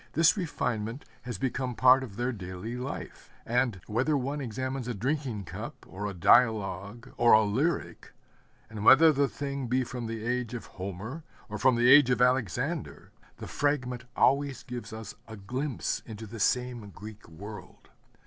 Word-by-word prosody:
This 165 +1 +5
refinement 125 - -3 0.2
has 120 -5 -5
become 125 +2 -2
part 130 +3 +6
of 115 -7 -8
their 120 +3 -1
daily 95 +1 -6
life; 125 +3 -7 0.2
and 120 -4 0
whether 130 +8 +1
one 140 +3 -3
examines 130 +1 -4
a 125 - -3
drinking 130 -2 -2
cup 85 - -8
or 105 +2 -5
a 100 - -4
dialogue 105 +2 +2
or 120 0 +5
a 110 - +7
lyric, 135 +12 -1 0.6
and 105 -2 -7
whether 155 +7 +8
the 140 -1 +2
thing 140 -2 -4
be 130 +2 +1
from 125 -1 -5
the 110 -1 -5
age 125 -1 -2
of 120 - -6
Homer 100 - -7 0.3
or 105 0 -5
from 130 -2 +4
the 120 +1 +3
age 135 0 +8
of 125 - +2
Alexander, 125 -5 0 0.3
the - - -8
fragment 125 -4 -1
always 140 -1 +2
gives 125 -2 -7
us 110 -1 -7
a 110 -1 -9
glimpse 125 +7 -3
into 110 -1 -8
the 110 +2 -9
same 125 -1 0
Greek 105 -1 -11
world. 100 +6 -11
120 Hz, 165 wpm, -29 LUFS, 110-130 Hz, 0.6 s, whether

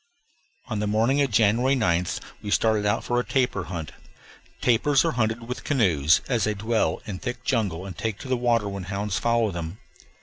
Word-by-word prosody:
On 110 -5 -3
the 105 - -1
morning 115 +7 +2
of 140 - +2
January 115 +5 +3
9th 90 -7 0 0.2
we 105 - -6
started 105 0 +2
out 105 - +1
for 120 0 0
a - - 0
tapir 125 -9 0
hunt. 80 -5 -5 0.7
Tapirs 130 +4 +3
are 165 - +2
hunted 115 -3 -1
with 125 - -5
canoes, 90 - +3
as 120 -6 +1
they 105 -1 0
dwell 110 +3 0
in 95 -3 -5
thick 125 -2 -5
jungle 100 -9 -1
and 95 - -7
take 110 -1 -3
to - - -9
the 130 - +1
water 120 -3 +1
when 100 -2 -5
hounds 100 0 -2
follow 115 -2 +1
them. 85 +1 -5
110 Hz, 195 wpm, -25 LUFS, 100-125 Hz, 0.7 s, January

